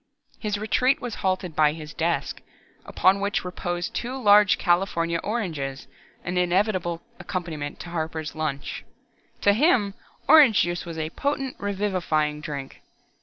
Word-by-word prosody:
His 210 -2 -2
retreat 250 +5 +2
was 245 -2 -5
halted 185 -3 -1
by 150 -1 +4
his 155 -1 -9
desk, 170 +1 -1 0.4
upon 190 +2 +3
which 200 -2 -1
reposed 175 -1 -3
two 250 +2 -3
large 205 -4 +5
California 175 -2 +1
oranges, 160 - -3 0.4
an 180 +1 -1
inevitable 180 -2 0 0.2
accompaniment 160 -6 -5
to 170 - -8
Harper's 160 -1 -3
lunch. 155 -3 -4 0.6
To 205 - +5
him, 225 - +3 0.3
orange 285 -10 +7
juice 175 +1 -3
was 165 -1 -6
a 160 0 -3
potent, 275 - -2
revivifying 185 -7 -1
drink. 140 -3 -7
180 Hz, 130 wpm, -25 LUFS, 160-205 Hz, 0.6 s, orange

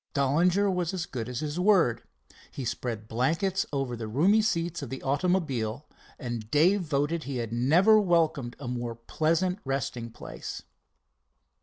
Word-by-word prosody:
Dollinger 170 +9 +3
was 180 0 -1
as 175 -3 -2
good 125 -9 -5
as 125 -1 -4
his 155 +2 -3
word. 180 - +3 0.5
He 135 - -6
spread 115 -2 -4
blankets 165 - 0
over 135 -4 -2
the 115 -1 -5
roomy 175 - +4
seats 170 -6 -1
of 140 - -6
the 130 - -6
automobile, 140 -5 0 0.3
and 120 -5 -5
Dave 175 - +4
voted 155 0 -1
he 135 -1 -3
had 115 -2 -3
never 170 - +5
welcomed 160 -9 +1
a 140 - -7
more 120 -1 -3
pleasant 165 - 0
resting 130 -3 -3
place. 115 - -8
145 Hz, 150 wpm, -28 LUFS, 120-175 Hz, 0.5 s, never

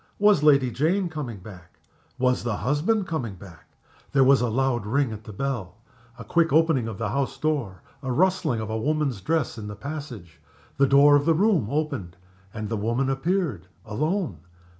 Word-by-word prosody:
Was 205 -5 +4
Lady 140 -4 +4
Jane 170 - 0
coming 145 -9 -5
back? 90 -4 -13 0.4
Was 125 0 +1
the 115 -4 -2
husband 160 - 0
coming 130 - -4
back? 85 -5 -14 0.5
There 135 - +5
was 135 0 +5
a 120 - +1
loud 120 -2 0
ring 135 +2 +1
at 110 -1 -8
the - - -8
bell 105 -5 -4 0.4
a 115 - -8
quick 165 +9 +1
opening 155 -6 +3
of 110 -3 -6
the 115 -1 -2
house 140 +4 -2
door 140 -12 -2 0.2
a 130 -2 -3
rustling 180 -4 +1
of 110 0 -5
a 110 - -2
woman's 145 -4 -1
dress 155 - -1
in 105 - -7
the 105 - -7
passage. 125 - -8 0.4
The 140 0 +4
door 140 +2 +6
of 145 0 +2
the 165 - +4
room 185 - +2
opened, 140 - -3 0.3
and 110 0 -5
the 110 +1 -2
woman 120 +6 0
appeared 135 - -1 0.2
alone. 150 - -2
135 Hz, 180 wpm, -25 LUFS, 110-155 Hz, 0.5 s, door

